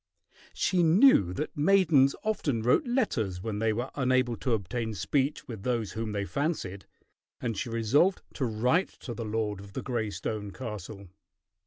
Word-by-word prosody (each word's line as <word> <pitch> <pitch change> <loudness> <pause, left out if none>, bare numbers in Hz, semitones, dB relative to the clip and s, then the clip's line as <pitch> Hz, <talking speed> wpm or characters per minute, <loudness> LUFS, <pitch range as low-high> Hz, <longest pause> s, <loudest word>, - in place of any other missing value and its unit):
She 185 -2 +2
knew 165 - +5
that 150 - -4
maidens 150 -4 +4
often 145 - -1
wrote 125 - +3
letters 120 - 0
when 105 +1 -4
they 110 0 +2
were 120 +5 -3
unable 130 -3 +1
to 125 - -1
obtain 110 +2 -2
speech 135 +9 -1
with 110 -5 -7
those 115 -3 -1
whom 110 +1 -4
they 100 -1 -2
fancied, 120 - -3 0.5
and 115 -3 -2
she 110 - -3
resolved 115 - +2
to 135 - -2
write 125 - +1
to 120 - -5
the 115 -1 -5
lord 105 -2 -2
of 100 0 -12
the - - -4
gray 120 -5 -2
stone 105 +2 -4
castle. 105 -4 -7
115 Hz, 165 wpm, -29 LUFS, 105-140 Hz, 0.5 s, knew